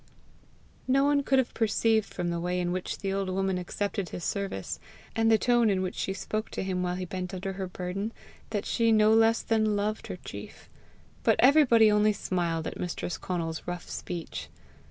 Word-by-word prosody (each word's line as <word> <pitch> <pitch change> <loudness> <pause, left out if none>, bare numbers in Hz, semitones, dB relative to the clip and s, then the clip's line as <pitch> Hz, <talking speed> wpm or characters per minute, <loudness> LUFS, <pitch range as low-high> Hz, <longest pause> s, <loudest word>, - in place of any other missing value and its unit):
No 270 +1 +4
one 285 0 +3
could 270 -1 +2
have 260 -2 +1
perceived 220 -1 +2
from 175 -1 -2
the 170 - -2
way 180 +1 -1
in 175 -1 0
which 185 0 -3
the 195 -1 -2
old 195 -1 -1
woman 190 0 0
accepted 200 +1 -3
his 175 - -6
service, 195 - -3 0.4
and 225 0 +3
the 220 - +6
tone 240 -1 +3
in 190 -2 +1
which 185 - -2
she - - -2
spoke 215 +3 -3
to - - -4
him 185 -1 -1
while 180 0 -1
he 185 0 -4
bent 185 +1 -5
under 190 +1 -4
her 190 0 -4
burden, 180 +4 -4 0.4
that 205 -3 -2
she 230 -1 +2
no 215 0 +5
less 225 +1 +4
than 215 -2 +2
loved 210 +1 -2
her - - -5
chief; - - -9 0.5
but - - +4
everybody 250 -6 +6
only 210 0 +4
smiled 170 -5 -1
at - - -5
mistress 180 0 -3
Conal's 165 -3 -3
rough 175 -1 -5
speech. 170 -2 -6
195 Hz, 195 wpm, -28 LUFS, 180-220 Hz, 0.5 s, the